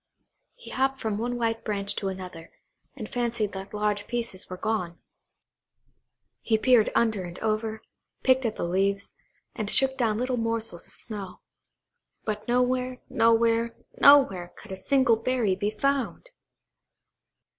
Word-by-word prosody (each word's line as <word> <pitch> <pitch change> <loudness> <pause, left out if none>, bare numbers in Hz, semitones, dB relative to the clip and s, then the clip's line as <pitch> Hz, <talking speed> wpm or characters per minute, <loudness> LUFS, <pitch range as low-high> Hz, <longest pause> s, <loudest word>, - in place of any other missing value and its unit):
He - - -12
hopped 270 +1 0
from 215 -2 -2
one 245 +2 -2
white 225 -1 -1
branch 200 -2 -2
to 195 - -2
another, 185 -3 -7 0.4
and 225 -6 -6
fancied 235 -4 -1
that 190 0 -7
large 210 -1 -1
pieces 235 -6 -3
were 185 - -6
gone. 180 -5 -2 1.4
He 220 - +2
peered 240 -1 +4
under 220 -5 +2
and 175 0 -8
over, 220 0 -2 0.4
picked 260 0 +4
at 220 - -3
the - - -4
leaves, 195 +3 0 0.4
and 215 -4 -2
shook 265 +2 +4
down 220 -3 +2
little 250 +1 -1
morsels 230 -6 -3
of - - -15
snow; 205 -5 -8 0.8
but 210 -1 -4
nowhere, 250 +1 +1
nowhere, 230 0 +3 0.2
nowhere, 195 -12 +6
could 215 - -12
a - - -3
single 250 +3 +3
berry 230 -4 +1
be 205 +2 -1
found! 275 - -1
225 Hz, 140 wpm, -27 LUFS, 200-245 Hz, 1.4 s, nowhere